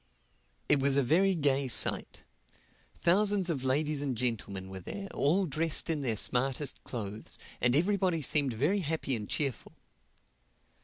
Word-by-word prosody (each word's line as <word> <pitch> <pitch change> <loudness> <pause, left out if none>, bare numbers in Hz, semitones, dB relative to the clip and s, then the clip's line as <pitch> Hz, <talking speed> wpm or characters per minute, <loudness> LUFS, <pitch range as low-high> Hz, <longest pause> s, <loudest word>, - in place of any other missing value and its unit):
It 145 - +4
was 135 0 +2
a 140 - +3
very 185 +9 +2
gay 140 -3 +1
sight. 120 - +2 0.8
Thousands 195 0 +2
of 135 -5 -4
ladies 145 +2 0
and 135 -4 -2
gentlemen 105 -6 -3
were 95 0 -7
there, 195 - -6
all 180 +7 +1
dressed 160 +1 +1
in 155 -3 -2
their 120 -5 -1
smartest 130 +5 0
clothes; 105 -3 -6 0.2
and 125 +1 +2
everybody 180 -1 +1
seemed 140 -2 +1
very 150 - 0
happy 155 -5 -2
and 105 -3 -6
cheerful. 140 -6 -3
140 Hz, 145 wpm, -30 LUFS, 125-165 Hz, 0.8 s, It